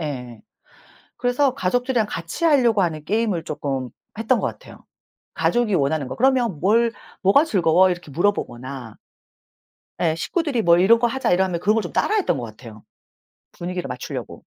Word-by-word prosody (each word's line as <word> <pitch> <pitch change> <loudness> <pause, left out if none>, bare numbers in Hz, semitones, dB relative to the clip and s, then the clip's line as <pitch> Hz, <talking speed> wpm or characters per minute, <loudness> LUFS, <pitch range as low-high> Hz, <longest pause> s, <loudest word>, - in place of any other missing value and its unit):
예. 125 -7 -6 0.8
그래서 250 +2 +1
가족들이랑 245 +3 0
같이 170 - -5
하려고 245 - +4
하는 155 -3 -2
게임을 205 -3 0
쪼끔 135 -5 -3 0.3
했던 225 +2 +1
것 - - -1
같아요. - - -13 0.5
가족이 240 -4 +1
원하는 140 -2 0
거. 130 - -6
그러면 245 - +2
"뭘 230 +5 +3 0.3
뭐가 205 +10 +5
즐거워?" 185 - +3
이렇게 175 -4 -5
물어보거나 130 - -3 1.0
예 160 -2 +2
식구들이 285 - -1
뭘 170 -3 +4
"이런 230 +4 +5
거 240 - +2
하자." 250 -6 -1
이러면 180 -1 +1
그런 205 +5 +2
걸 225 - +2
좀 175 - -7
따라 430 - +1
했던 405 - +1
것 125 - -5
같아요, 110 -1 -12 0.7
분위기를 180 +1 -5
맞추려고. - - -7
185 Hz, 350 characters per minute, -22 LUFS, 155-235 Hz, 1.0 s, 뭐가